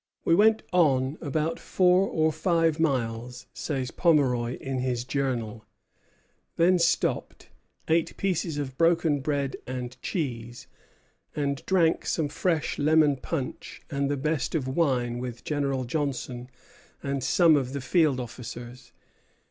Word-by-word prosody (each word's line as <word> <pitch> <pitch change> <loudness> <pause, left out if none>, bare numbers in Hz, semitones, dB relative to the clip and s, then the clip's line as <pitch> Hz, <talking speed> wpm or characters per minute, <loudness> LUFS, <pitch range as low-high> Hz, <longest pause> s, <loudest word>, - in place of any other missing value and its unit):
"We - - +4
went 215 +4 +4
on 140 -4 +2
about 155 +2 -1
four 185 +1 +3
or 160 -3 +1
five 165 0 +1
miles," 125 -4 -1
says 135 -5 -3
Pomeroy 130 -8 +2
in 135 -1 -4
his 125 -2 -1
Journal, 125 -5 -2 0.9
"then 180 +2 +4
stopped, 170 - 0 0.4
ate 165 0 +1
pieces 175 -5 -1
of 130 -2 -5
broken 165 -3 +3
bread 140 -1 -2
and 125 0 -6
cheese, 120 - -4 0.7
and 140 -2 -2
drank 170 -4 +2
some 155 -3 0
fresh 165 0 -1
lemon 150 -1 +4
punch 135 0 -5
and 140 0 0
the 145 - 0
best 155 +3 -1
of 140 -5 -1
wine 130 -5 0
with 125 -1 -6
General 140 -3 -1
Johnson 125 -2 -3 0.5
and 140 -2 -2
some 165 +2 +5
of 135 -2 -1
the 140 - -2
field 145 0 +2
officers." 120 +1 -8
140 Hz, 130 wpm, -27 LUFS, 125-160 Hz, 0.9 s, some